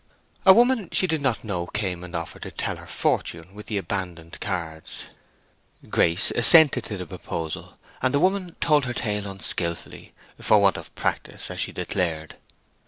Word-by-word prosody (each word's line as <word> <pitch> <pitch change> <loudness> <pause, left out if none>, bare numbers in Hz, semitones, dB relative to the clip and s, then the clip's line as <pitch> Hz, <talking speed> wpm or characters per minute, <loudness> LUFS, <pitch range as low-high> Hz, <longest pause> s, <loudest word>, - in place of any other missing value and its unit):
A - - +11
woman 235 -3 +2
she - - +3
did 160 -4 -1
not 135 -5 -1
know 90 -5 -4
came 95 -4 -3
and 90 0 -9
offered 85 -1 -6
to - - -6
tell - - -4
her - - -13
fortune 85 +3 -2
with 105 +1 -11
the 105 - -2
abandoned 90 -3 -5
cards. 85 -5 -5 0.9
Grace 85 +5 +4
assented 135 0 +7
to 105 - -5
the 90 - -6
proposal, 80 0 -7 0.2
and 130 - +1
the 140 - +1
woman 185 0 0
told 150 -4 +2
her 120 -1 -4
tale 105 -2 -2
unskilfully, 85 -3 -3 0.2
for 105 - +4
want 100 -2 +3
of - - -11
practice, - - -3
as - - -6
she - - 0
declared. 80 -4 -3
100 Hz, 170 wpm, -24 LUFS, 85-135 Hz, 0.9 s, A